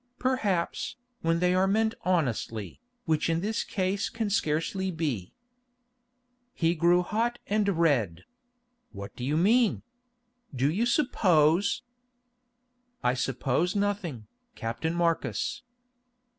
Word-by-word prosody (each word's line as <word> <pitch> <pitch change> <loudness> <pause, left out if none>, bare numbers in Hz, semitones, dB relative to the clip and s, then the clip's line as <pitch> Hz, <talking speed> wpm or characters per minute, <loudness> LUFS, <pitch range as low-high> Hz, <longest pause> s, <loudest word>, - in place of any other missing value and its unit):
"Perhaps, 215 -9 -1 0.3
when 165 0 +2
they 180 +1 +2
are 185 +1 +3
meant 220 +3 +2
honestly, 125 - -1 0.2
which 160 0 +1
in 165 0 +1
this 215 +3 -1
case 195 +1 -1
can 225 -3 -3
scarcely 190 +1 0
be." 145 - -3 1.2
He 165 0 +2
grew 175 +2 +3
hot 230 +5 -1
and 210 0 +1
red. 120 - +1 0.7
"What 100 0 -8
do 125 - -7
you 145 +4 0
mean? 220 +6 +3 0.7
Do 135 +4 +2
you 220 +8 +1
suppose——" 185 - +3 1.2
"I 125 - +3
suppose 135 - 0
nothing, 200 - -1 0.3
Captain 125 +9 -3
Marcus." 170 -1 0
170 Hz, 110 wpm, -28 LUFS, 150-205 Hz, 1.2 s, are